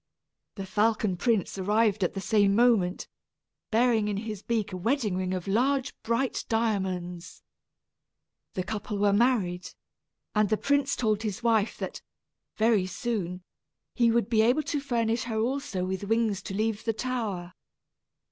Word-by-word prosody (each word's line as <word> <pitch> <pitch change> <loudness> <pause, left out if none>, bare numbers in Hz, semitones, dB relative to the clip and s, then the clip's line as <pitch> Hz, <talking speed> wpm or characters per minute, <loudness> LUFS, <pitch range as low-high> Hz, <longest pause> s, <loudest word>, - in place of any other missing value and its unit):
The 195 - -5
falcon 210 0 +1
prince 200 -1 0
arrived 210 +1 +2
at 180 - -1
the 195 - -3
same 205 -1 +3
moment, 220 -6 +3 0.6
bearing 225 -2 +3
in 205 -1 -1
his 210 -2 -5
beak 220 -4 -2
a - - -3
wedding 225 0 0
ring 185 0 -2
of 185 -1 -3
large 260 +6 +1
bright 235 +3 -1
diamonds. 185 -6 -2 1.1
The 185 - -1
couple 210 +1 -4
were 200 0 +3
married, 200 -6 +1 0.6
and 210 -2 +2
the 215 - +2
prince 280 +2 +1
told 215 -3 0
his 215 -1 -4
wife 225 -2 +2
that, - - -5 0.6
very 220 -4 +3
soon, 185 -3 -3 0.5
he 235 -2 +3
would 230 -3 +2
be 225 -2 +3
able 250 +7 +3
to 295 0 -2
furnish 235 -3 0
her 225 -2 -3
also 230 -5 -1
with 190 +1 -3
wings 225 -2 +1
to 195 - -5
leave 215 0 -1
the 225 - 0
tower. 215 -8 -3
215 Hz, 150 wpm, -28 LUFS, 195-235 Hz, 1.1 s, same